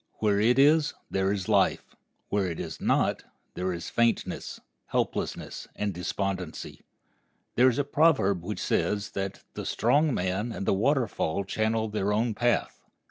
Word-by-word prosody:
Where 105 -2 +1
it 120 +4 +3
is, 150 +3 +4 0.2
there 95 0 +1
is 95 -3 -2
life; - - +1 0.3
where 100 -2 +1
it 85 -2 -4
is - - -6
not, - - +1 0.3
there 90 +1 -2
is 85 -2 -5
faintness, 115 0 0 0.3
helplessness, - - -2
and 105 -1 -2
despondency. 90 0 -4 0.7
There 125 +2 +5
is 125 - -2
a 145 - +2
proverb 140 - +3
which 105 +4 -4
says 105 0 0
that 95 0 -4
"the - - -5
strong 145 +7 +2
man 95 +2 -1
and 100 - -4
the - - +3
waterfall 110 - +1
channel 110 +3 0
their 105 -1 -1
own 110 +2 +1
path." 120 +3 0
105 Hz, 150 wpm, -27 LUFS, 95-120 Hz, 0.7 s, There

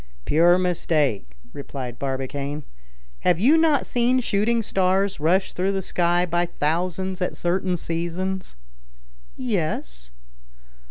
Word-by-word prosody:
"Pure 170 +3 +5
mistake," 150 - 0 0.2
replied 135 -4 -7
Barbicane. 140 +2 -3 0.6
"Have 105 - +2
you 265 - +5
not 320 -3 +3
seen 245 +1 +2
shooting 230 0 +1
stars 190 -1 +1
rush 180 +6 +1
through 190 +2 0
the 195 -1 -2
sky 175 0 +1
by 175 0 0
thousands 180 +4 -2
at 180 - -2
certain 180 +1 0
seasons?" 175 - -3 0.8
"Yes." 155 - -3
175 Hz, 110 wpm, -23 LUFS, 150-190 Hz, 0.8 s, Pure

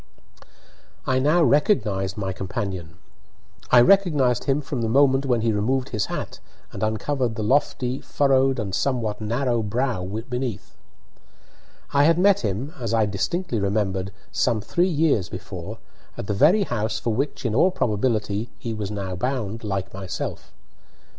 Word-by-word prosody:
I 130 0 +2
now 155 +6 +3
recognised 110 - +2
my 95 -2 -2
companion. 95 -3 -5 0.7
I 125 - +7
recognised 145 - +3
him 135 +1 +2
from 135 -3 -4
the 115 - 0
moment 135 +2 +3
when 120 -3 +2
he 115 0 +2
removed 125 +5 0
his 105 -3 -1
hat - - -5 0.3
and - - -8
uncovered 115 +3 -1
the 110 - -3
lofty, 130 +1 +1
furrowed, 135 -1 +2
and 100 -5 -3
somewhat 110 -3 -1
narrow 120 +2 0
brow 115 -1 -1 0.2
beneath. 125 -5 -4 1.2
I 140 0 +5
had 165 +1 +4
met 195 +2 +4
him, 115 - -3
as 115 -2 -1
I 110 -1 +3
distinctly 110 - -2
remembered, 100 -1 -1 0.2
some 120 -3 +1
three 175 - +1
years 150 - +1
before, - - -7 0.4
at - - -5
the 105 - -1
very 165 - +5
house 110 - -2
for 115 - -1
which, 135 +3 -2
in 115 - 0
all 140 +10 +4
probability, 110 - -1
he 115 - -5
was 105 -2 -4
now 100 -3 -4
bound, 115 0 -3
like 95 -2 -3
myself. 95 -2 -5
115 Hz, 150 wpm, -23 LUFS, 105-135 Hz, 1.2 s, I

